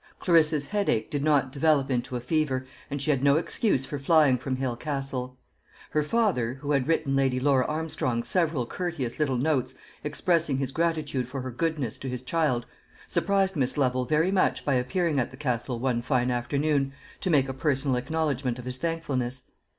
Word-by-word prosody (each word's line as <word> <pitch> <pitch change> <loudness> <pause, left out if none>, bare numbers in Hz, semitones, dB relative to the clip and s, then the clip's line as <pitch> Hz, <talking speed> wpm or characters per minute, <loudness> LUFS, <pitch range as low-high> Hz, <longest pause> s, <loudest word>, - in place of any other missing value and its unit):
Clarissa's 155 -4 +3
headache 200 - 0
did 145 -1 -1
not 145 -4 +2
develop 140 -1 +2
into 125 0 -1
a - - -1
fever, 130 0 0 0.2
and 145 - -3
she 150 +3 +1
had 135 -3 +1
no 140 0 +5
excuse 165 - +1
for 145 - -5
flying 145 -2 +4
from 130 +1 -3
Hale 130 -2 -2
Castle. 135 -2 -4 0.5
Her 150 - +2
father, 150 - +1
who 145 +2 -4
had 140 -2 +2
written 140 -4 +1
Lady 135 -2 +2
Laura 135 -1 +3
Armstrong 150 -6 -1
several 160 -7 0
courteous 155 -5 -4
little 135 -4 +1
notes 135 -1 0 0.3
expressing 155 -1 +1
his 135 -1 -2
gratitude 155 -6 -1
for 135 +1 -5
her 130 0 -5
goodness 145 -3 -2
to 135 - -5
his 125 0 -5
child, 130 -5 0 0.4
surprised 195 -1 +1
Miss 130 -3 0
Lovel 130 -2 +1
very 155 +6 +2
much 195 -1 +1
by 140 - +2
appearing 150 +4 +1
at 120 - 0
the 130 - -13
Castle 125 -3 -2
one 120 -1 0
fine 125 0 +1
afternoon 140 +3 0 0.3
to 185 - 0
make 140 -5 +4
a 135 - -3
personal 135 -1 0
acknowledgment 135 -2 -1
of 125 - -8
his 125 0 -4
thankfulness. 135 -6 -2
135 Hz, 180 wpm, -27 LUFS, 130-155 Hz, 0.5 s, no